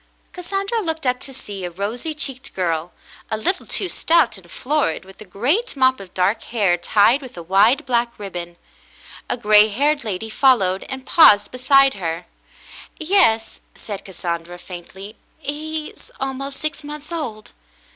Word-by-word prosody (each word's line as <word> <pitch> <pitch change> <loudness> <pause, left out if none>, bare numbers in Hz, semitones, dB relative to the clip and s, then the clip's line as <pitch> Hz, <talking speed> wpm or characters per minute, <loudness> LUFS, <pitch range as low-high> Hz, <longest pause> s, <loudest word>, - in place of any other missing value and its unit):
Cassandra 395 +5 -2
looked 320 -5 -3
up 250 0 +1
to 275 - -8
see 205 -7 -7
a 180 - -3
rosy 220 - -4
cheeked 270 -3 -3
girl, 170 -2 -1 0.4
a 220 - -1
little 220 - -1
too 385 - -1
stout 330 -6 +2
and 185 -3 -13
florid, 275 - -1
with 190 +2 -15
a - - -9
great 275 - 0
mop 260 -1 +3
of 190 -2 -11
dark 190 +4 +1
hair 205 -7 +2
tied 205 - +3
with 255 -8 -11
a 170 - -6
wide 210 - +3
black 240 -2 0
ribbon. 175 -4 -7 0.7
A - - 0
gray 215 -2 +6
haired 285 +7 +1
lady 220 0 -4
followed, 200 -8 +3
and 265 -1 -6
paused 210 -11 +6
beside 270 +2 +4
her. 170 -2 -4 0.7
"Yes," 315 - +2
said 200 -3 -7
Cassandra, 175 -2 -5
faintly. 190 +4 -10 0.2
"He 310 +1 -5
is - - -14
almost 270 +1 -4
six 310 0 -4
months 300 +2 -8
old." 245 -11 -5
235 Hz, 155 wpm, -21 LUFS, 195-290 Hz, 0.7 s, gray